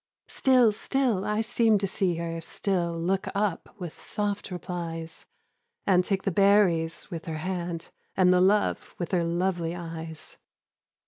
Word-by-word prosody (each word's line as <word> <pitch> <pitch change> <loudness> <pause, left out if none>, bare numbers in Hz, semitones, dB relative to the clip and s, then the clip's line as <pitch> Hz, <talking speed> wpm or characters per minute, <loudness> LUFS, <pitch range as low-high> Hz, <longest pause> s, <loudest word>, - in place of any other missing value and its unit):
Still, 255 -4 +4
still 240 -4 0
I 210 +1 +1
seemed 225 -1 +3
to - - +1
see 185 -2 0
her, 165 0 -4
still 170 -1 -1
Look 190 +3 0
up 200 -3 -1
with 175 -5 -8
soft 205 -1 -3
replies, 170 -3 -6 0.6
And 180 -2 +4
take 195 +1 -1
the 195 - 0
berries 190 -3 +3
with 165 -2 -5
her 160 -2 -4
hand, 170 0 -4 0.3
And 180 -1 +5
the 180 - +4
love 200 +3 +2
with 175 - -4
her 180 -3 +2
lovely 170 0 -1
eyes. 165 -2 -7
180 Hz, 145 wpm, -27 LUFS, 170-200 Hz, 0.6 s, And